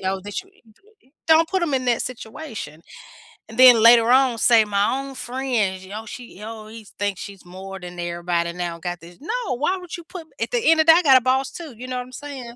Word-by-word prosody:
know 190 Hz, 0 st, -2 dB
that, 205 Hz, -, -5 dB
you 380 Hz, -, -24 dB, 0.8 s
don't 320 Hz, 0 st, +5 dB
put 380 Hz, -, -1 dB
them 330 Hz, -5 st, -1 dB
in 255 Hz, -1 st, -1 dB
that 240 Hz, -1 st, +1 dB
situation, 220 Hz, -, -8 dB, 0.7 s
and 225 Hz, -, -11 dB
then 245 Hz, -3 st, +8 dB
later 230 Hz, 0 st, +7 dB
on, 260 Hz, -2 st, +4 dB
say, 230 Hz, -1 st, +5 dB
"My 205 Hz, -1 st, +1 dB
own 275 Hz, 0 st, -8 dB
friend, 240 Hz, -7 st, -2 dB
oh, 220 Hz, -, -7 dB
she 235 Hz, -3 st, -10 dB
oh, 220 Hz, -1 st, -8 dB
he 225 Hz, 0 st, -11 dB
thinks 205 Hz, -2 st, -2 dB
she's 195 Hz, -3 st, -10 dB
more 190 Hz, +2 st, -9 dB
than 180 Hz, -1 st, -9 dB
everybody 170 Hz, 0 st, -2 dB
now, 175 Hz, -1 st, -5 dB
got 175 Hz, 0 st, -5 dB
this." 170 Hz, +1 st, -14 dB
No. 450 Hz, -, -3 dB
Why 360 Hz, +8 st, 0 dB
would 360 Hz, -1 st, -8 dB
you 340 Hz, -, -11 dB
put 335 Hz, -2 st, -10 dB
at -, -, -2 dB
the -, -, +1 dB
end 325 Hz, -, +4 dB
of -, -, +1 dB
that, 325 Hz, 0 st, +8 dB
I -, -, +1 dB
got 265 Hz, -3 st, +7 dB
a -, -, +2 dB
boss 260 Hz, +2 st, 0 dB
too, 315 Hz, -5 st, -9 dB
you 250 Hz, +2 st, -8 dB
know 255 Hz, 0 st, -4 dB
what 250 Hz, -, -3 dB
I'm 250 Hz, -, -16 dB
saying? 260 Hz, -4 st, -8 dB
235 Hz, 235 wpm, -22 LUFS, 195-270 Hz, 0.8 s, then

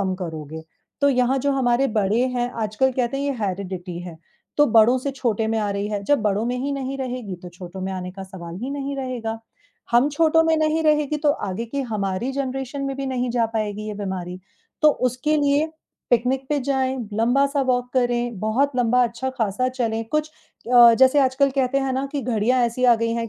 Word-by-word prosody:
कम 190 Hz, -1 st, 0 dB
करोगे। 160 Hz, -3 st, -6 dB, 0.4 s
तो 285 Hz, -, +4 dB
यहाँ 255 Hz, -1 st, +2 dB
जो 280 Hz, +2 st, 0 dB
हमारे 260 Hz, 0 st, +2 dB
बड़े 210 Hz, +2 st, +2 dB
हैं, 245 Hz, 0 st, 0 dB
आजकल 220 Hz, +5 st, +1 dB
कहते 250 Hz, +1 st, -1 dB
हैं, 280 Hz, -, -2 dB
ये 285 Hz, -, 0 dB
हैरिडिटी 185 Hz, -3 st, -4 dB
है, 175 Hz, -2 st, -9 dB, 0.4 s
तो 295 Hz, -, +5 dB
बड़ों 225 Hz, +3 st, +6 dB
से 275 Hz, +2 st, -3 dB
छोटे 235 Hz, -5 st, -1 dB
में 225 Hz, 0 st, 0 dB
आ 210 Hz, -1 st, -1 dB
रही 200 Hz, +1 st, -2 dB
है। 205 Hz, -1 st, -3 dB
जब 290 Hz, +3 st, +2 dB
बड़ों 210 Hz, +1 st, +1 dB
में 245 Hz, +1 st, -1 dB
ही 275 Hz, +3 st, -2 dB
नहीं 275 Hz, -1 st, -3 dB
रहेगी, 250 Hz, -6 st, -4 dB
तो 180 Hz, +1 st, -10 dB
छोटों 180 Hz, +1 st, -9 dB
में 190 Hz, +1 st, -3 dB
आने 180 Hz, -1 st, -5 dB
का 195 Hz, -, -8 dB
सवाल 180 Hz, -3 st, -9 dB
ही 265 Hz, -, -3 dB
नहीं 280 Hz, 0 st, -4 dB
रहेगा। 245 Hz, -4 st, -4 dB, 0.5 s
हम 240 Hz, +4 st, +4 dB
छोटों 325 Hz, +2 st, +3 dB
में 325 Hz, 0 st, +3 dB
नहीं 310 Hz, +1 st, +1 dB
रहेगी, 300 Hz, -1 st, +2 dB
तो 300 Hz, -1 st, +2 dB, 0.2 s
आगे 190 Hz, +5 st, -3 dB
की 280 Hz, +5 st, -3 dB
हमारी 200 Hz, +3 st, -2 dB
जनरेशन 270 Hz, 0 st, -3 dB
में 275 Hz, -1 st, -3 dB
भी 275 Hz, 0 st, -3 dB
नहीं 250 Hz, -1 st, -1 dB
जा 235 Hz, -1 st, +1 dB
पाएगी 215 Hz, 0 st, -3 dB
ये 210 Hz, -, -4 dB
बीमारी। 185 Hz, -3 st, -5 dB, 0.4 s
तो 305 Hz, -, +7 dB, 0.2 s
उसके 300 Hz, +6 st, 0 dB
लिए 290 Hz, +1 st, +2 dB, 0.4 s
पिकनिक 255 Hz, +3 st, +1 dB
पे 295 Hz, -1 st, 0 dB
जाएँ, 265 Hz, 0 st, 0 dB, 0.2 s
लंबा-सा 275 Hz, +6 st, +2 dB
वॉक 245 Hz, 0 st, 0 dB
करें, 240 Hz, -3 st, 0 dB
बहुत 255 Hz, +7 st, +1 dB
लंबा 250 Hz, 0 st, +3 dB
अच्छा 240 Hz, +3 st, -3 dB
खासा 225 Hz, +4 st, +1 dB
चलें, 230 Hz, -3 st, -2 dB
कुछ 305 Hz, +3 st, -1 dB, 0.4 s
अ, 240 Hz, -1 st, +9 dB
जैसे 260 Hz, +2 st, +5 dB
आजकल 270 Hz, +1 st, +2 dB
कहते 265 Hz, +1 st, +2 dB
हैं 270 Hz, -1 st, -1 dB
ना 265 Hz, +1 st, -1 dB
कि 285 Hz, -, -1 dB
घड़ियाँ 245 Hz, +1 st, +1 dB
ऐसी 235 Hz, +2 st, -2 dB
आ 245 Hz, -1 st, +7 dB
गई 230 Hz, 0 st, 0 dB
हैं 230 Hz, -1 st, -2 dB
245 Hz, 210 wpm, -22 LUFS, 210-275 Hz, 0.5 s, अ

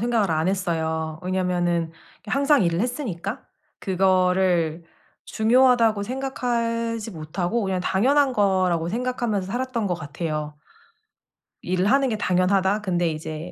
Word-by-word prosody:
생각을 225 Hz, -5 st, +1 dB
안 160 Hz, +2 st, +1 dB
했어요. 160 Hz, -4 st, -2 dB
왜냐하면은 175 Hz, -3 st, -1 dB, 0.3 s
항상 280 Hz, +3 st, +3 dB
일을 170 Hz, +1 st, +1 dB
했으니까. 235 Hz, -, -3 dB, 0.4 s
그거를 185 Hz, -3 st, +2 dB, 0.4 s
중요하다고 230 Hz, -2 st, +3 dB
생각하지 230 Hz, -3 st, -2 dB
못하고 175 Hz, +6 st, -3 dB
그냥 190 Hz, -2 st, -1 dB
‘당연한 270 Hz, +9 st, +2 dB
거.‘라고 185 Hz, -6 st, +1 dB
생각하면서 235 Hz, -2 st, -2 dB
살았던 240 Hz, +1 st, -2 dB
것 180 Hz, -, 0 dB
같아요. 155 Hz, -1 st, -4 dB, 1.1 s
일을 185 Hz, +1 st, 0 dB
하는 270 Hz, +5 st, +3 dB
게 220 Hz, -, -1 dB
당연하다. 190 Hz, +2 st, +1 dB
근데 175 Hz, -4 st, 0 dB
이제 155 Hz, +2 st, -6 dB
190 Hz, 300 characters per minute, -23 LUFS, 175-230 Hz, 1.1 s, 항상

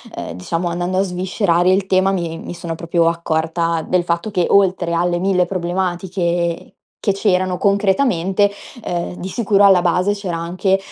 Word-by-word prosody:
ehm, -, -, -6 dB
diciamo 165 Hz, -, -2 dB
andando 175 Hz, +2 st, -1 dB
a -, -, +3 dB
sviscerare 180 Hz, -1 st, +1 dB
il 190 Hz, 0 st, +1 dB
tema, 190 Hz, 0 st, +3 dB
mi 170 Hz, -3 st, -3 dB
mi -, -, -7 dB
sono 170 Hz, -1 st, -5 dB
proprio 170 Hz, 0 st, +1 dB
accorta 165 Hz, 0 st, -1 dB
del 180 Hz, -1 st, +1 dB
fatto 170 Hz, +5 st, -2 dB
che, 180 Hz, -3 st, +1 dB
oltre 185 Hz, -3 st, +2 dB
alle 175 Hz, +1 st, +1 dB
mille 180 Hz, -1 st, +2 dB
problematiche 175 Hz, -1 st, -2 dB, 0.3 s
che 200 Hz, -, +1 dB
c'erano 185 Hz, -2 st, +1 dB
concretamente, 200 Hz, -1 st, +2 dB, 0.3 s
ehm, 175 Hz, 0 st, -3 dB
di 185 Hz, +2 st, -6 dB
sicuro 205 Hz, -2 st, +2 dB
alla 190 Hz, -3 st, +6 dB
base 180 Hz, +3 st, +1 dB
c'era 195 Hz, -4 st, -4 dB
anche, 185 Hz, +3 st, 0 dB
180 Hz, 160 wpm, -18 LUFS, 170-195 Hz, 0.3 s, alla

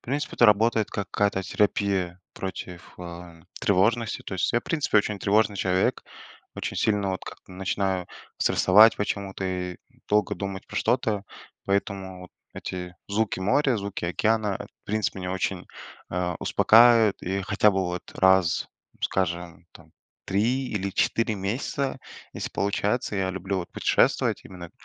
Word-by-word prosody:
принципе, 145 Hz, +4 st, -3 dB
это 120 Hz, -, +6 dB
работает 110 Hz, +1 st, +3 dB
как 100 Hz, -, -4 dB
какая-то 100 Hz, -2 st, +1 dB
терапия 95 Hz, -3 st, 0 dB
против, 90 Hz, -2 st, -7 dB
э, 85 Hz, -1 st, -9 dB, 0.2 s
тревожности. 110 Hz, +4 st, +1 dB
То -, -, -8 dB
есть 90 Hz, -, 0 dB
я, 120 Hz, -, +3 dB
в -, -, -30 dB
принципе, 150 Hz, -9 st, 0 dB
очень 105 Hz, -1 st, +2 dB
тревожный 105 Hz, 0 st, +2 dB
человек, 95 Hz, 0 st, +1 dB, 0.5 s
очень -, -, -4 dB
сильно 105 Hz, -2 st, +1 dB
вот 95 Hz, -, -4 dB
как-то -, -, -11 dB
начинаю 95 Hz, -1 st, -1 dB, 0.3 s
стрессовать 105 Hz, +4 st, +6 dB
почему-то 100 Hz, -1 st, -3 dB
и, 90 Hz, -1 st, -3 dB, 0.3 s
долго 105 Hz, -1 st, +2 dB
думать 95 Hz, -1 st, -5 dB
про -, -, -8 dB
что-то, 110 Hz, -5 st, +1 dB, 0.4 s
поэтому 95 Hz, -1 st, -2 dB
вот 90 Hz, -, -12 dB, 0.2 s
эти 90 Hz, -1 st, -6 dB
звуки 105 Hz, -1 st, 0 dB
моря, 125 Hz, +6 st, +2 dB
звуки 100 Hz, -4 st, -4 dB
океана, 105 Hz, +3 st, +1 dB
э, -, -, -6 dB
в -, -, -23 dB
принципе, 105 Hz, -2 st, -1 dB
меня 90 Hz, 0 st, -4 dB
очень, 95 Hz, -1 st, -2 dB, 0.4 s
а, 90 Hz, -1 st, -2 dB
успокаивают, 115 Hz, -2 st, +5 dB
и 95 Hz, +2 st, -2 dB
хотя 105 Hz, +1 st, +3 dB
бы 95 Hz, -1 st, 0 dB
вот 90 Hz, 0 st, -3 dB
раз, 95 Hz, -3 st, +3 dB, 0.4 s
скажем 85 Hz, -3 st, -2 dB
там, 80 Hz, -1 st, -17 dB, 0.3 s
3 120 Hz, +7 st, 0 dB
или 100 Hz, -2 st, -2 dB
4 115 Hz, +3 st, +1 dB
месяца, 125 Hz, +7 st, -2 dB, 0.3 s
если -, -, -5 dB
получается, 105 Hz, +3 st, -1 dB
я 95 Hz, -1 st, 0 dB
люблю 95 Hz, +1 st, -3 dB
вот 85 Hz, -, -6 dB
путешествовать -, -, +2 dB
именно, 90 Hz, -2 st, -10 dB
100 Hz, 145 wpm, -26 LUFS, 90-105 Hz, 0.5 s, это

